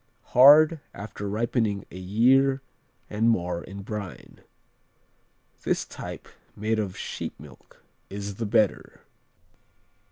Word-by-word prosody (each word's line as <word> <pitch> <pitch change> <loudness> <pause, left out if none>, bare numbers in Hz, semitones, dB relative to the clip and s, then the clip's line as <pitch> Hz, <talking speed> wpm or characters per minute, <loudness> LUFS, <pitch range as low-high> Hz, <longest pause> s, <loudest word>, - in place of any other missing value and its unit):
Hard, 150 +5 +8 0.2
after 100 0 -6
ripening 110 -2 -1
a 90 - -9
year 130 +8 +3 0.4
and 110 +2 +1
more 90 -5 0
in 100 +1 -9
brine. 100 -2 -7 1.2
The - - +1
type - - -8 0.3
made 110 +1 -1
of 100 -4 -3
sheep - - -6
milk - - -16 0.3
is 100 0 -6
the 115 - -2
better. 110 -1 0
105 Hz, 105 wpm, -26 LUFS, 100-120 Hz, 1.2 s, Hard